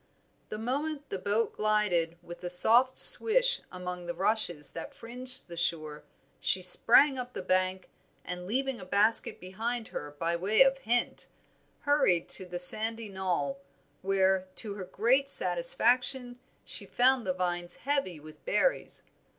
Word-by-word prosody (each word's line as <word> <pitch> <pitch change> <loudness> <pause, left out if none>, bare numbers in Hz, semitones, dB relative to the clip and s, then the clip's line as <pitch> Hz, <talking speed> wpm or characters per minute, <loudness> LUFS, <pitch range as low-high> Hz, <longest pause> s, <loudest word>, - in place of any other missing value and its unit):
The 215 - -7
moment 285 +6 -5
the 195 - -6
boat 205 +4 -2
glided 205 -6 -1
with 175 +1 -13
a 175 - -5
soft 235 +8 +5
swish - - +7
among 180 -1 -9
the 175 - -6
rushes 180 -6 +1
that - - -10
fringed 250 +2 -8
the 170 - -11
shore, 155 -3 -4 0.3
she 185 - -1
sprang 255 +9 +2
up 250 0 -8
the - - -8
bank, 185 0 -2 0.4
and 180 0 -8
leaving 265 +3 -4
a - - -11
basket 205 +4 +1
behind 225 +6 -6
her 145 0 -9
by 170 +2 -3
way 200 +8 +2
of 270 0 -1
hint, 240 0 -1 0.5
hurried 275 - 0
to 185 - +3
the 175 0 -7
sandy 220 +5 +3
knoll, 190 +8 -4 0.4
where, 190 -1 -1
to 210 -3 0
her 195 -2 -9
great 255 +9 -1
satisfaction, 245 +7 +2 0.3
she - - 0
found 255 0 +1
the - - 0
vines 175 -1 -4
heavy 270 - -4
with 155 +1 -16
berries. - - -2
205 Hz, 150 wpm, -27 LUFS, 180-250 Hz, 0.5 s, swish